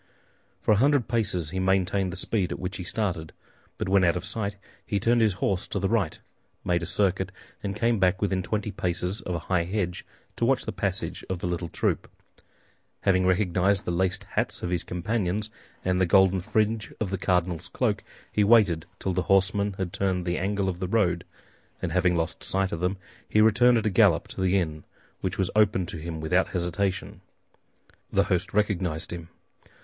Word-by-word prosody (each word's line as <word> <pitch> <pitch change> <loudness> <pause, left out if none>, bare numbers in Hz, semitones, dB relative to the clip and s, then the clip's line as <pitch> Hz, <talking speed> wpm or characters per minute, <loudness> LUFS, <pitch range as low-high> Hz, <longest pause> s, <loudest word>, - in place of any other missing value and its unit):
For - - +2
a 105 - +5
hundred 140 +1 +3
paces 100 -9 0
he 95 - -2
maintained 95 0 +1
the 90 - -6
speed 95 0 -1
at - - -3
which 90 +2 -4
he 90 - -5
started; 90 -5 -2 0.4
but - - -3
when 95 0 +4
out 85 -1 +3
of 90 - -5
sight 100 +1 -3 0.3
he 100 - -1
turned 120 +3 +3
his 110 -3 +4
horse 95 0 -1
to - - -3
the 95 0 +1
right, 100 -7 0 0.5
made 85 -1 +1
a 85 - -3
circuit, 95 -2 0 0.3
and 100 -1 -3
came 115 0 +1
back 95 0 +3
within 95 -2 0
twenty 105 +2 -2
paces 90 +2 -2
of 90 - -3
a 85 - -5
high 90 -2 +1
hedge 90 -1 -2 0.3
to - - -2
watch - - +2
the - - -2
passage - - -3
of 95 - -1
the 85 - -5
little 85 -1 -2
troop. - - -1 0.9
Having 95 -1 +3
recognized 95 0 +2
the - - -1
laced 95 +2 0
hats 95 - -2
of 90 - -2
his 90 -2 0
companions 105 +2 -2 0.3
and 90 0 +2
the 90 - +3
golden 95 +1 +5
fringe 110 +2 0
of 100 -4 -2
the 95 - -1
cardinal's 90 -3 0
cloak, - - 0 0.3
he 105 - +2
waited 100 -7 +4
till 95 - -2
the 90 - +1
horsemen 100 +1 +3
had 95 -1 -4
turned 95 -2 0
the 85 0 -1
angle 100 +1 0
of 90 -2 -2
the 95 - -2
road, 90 -5 +1 0.6
and - - -3
having 90 -1 +2
lost 80 +1 -2
sight 95 0 0
of 85 - -3
them, 90 +3 0 0.3
he 105 - +3
returned 115 +3 +5
at 110 - -1
a 105 - +2
gallop 95 -5 +4
to - - -5
the 95 +1 +3
inn, 80 -4 -2 0.4
which - - -3
was 95 -1 0
opened 100 -4 +3
to - - -5
him 80 0 -5
without 90 +4 +2
hesitation. 95 +2 -2 0.9
The - - +3
host 90 -1 -1
recognized 90 -6 0
him. 85 -1 -7
95 Hz, 195 wpm, -26 LUFS, 90-100 Hz, 0.9 s, a